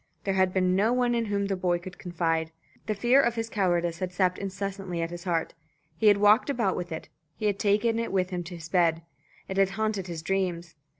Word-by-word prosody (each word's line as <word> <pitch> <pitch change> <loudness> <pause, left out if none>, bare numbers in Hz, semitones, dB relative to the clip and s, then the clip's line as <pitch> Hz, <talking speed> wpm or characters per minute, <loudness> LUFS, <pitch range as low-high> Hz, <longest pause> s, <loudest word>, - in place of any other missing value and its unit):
There 195 - 0
had 190 -1 +3
been 185 -1 +2
no 215 +5 +3
one 245 -1 +2
in 235 -1 0
whom 200 -1 -1
the 195 -1 -1
boy 180 -1 +1
could 180 +1 -10
confide. 165 -2 -1 0.4
The 215 - 0
fear 240 +7 +4
of 235 -3 0 0.2
cowardice 175 -4 0
had 185 -1 -3
sapped 180 0 +1
incessantly 195 -2 -4
at 165 - -4
his 175 +1 -8
heart. 165 -3 -1 0.4
He 215 - +2
had 205 -1 +7
walked 210 +6 +5
about 235 -8 +1
with 175 -1 -5
it; 160 - -5 0.3
he 215 - -5
had 205 -1 +1
taken 215 +3 +2
it 230 - -2
with 185 -1 0
him 175 -1 -3
to 175 +1 -7
his 165 -1 -9
bed. 165 -2 +2 0.4
It 190 - -5
had 195 -1 +4
haunted 215 -4 -1
his 165 -2 -6
dreams. 175 -2 -2
190 Hz, 225 wpm, -27 LUFS, 175-205 Hz, 0.4 s, had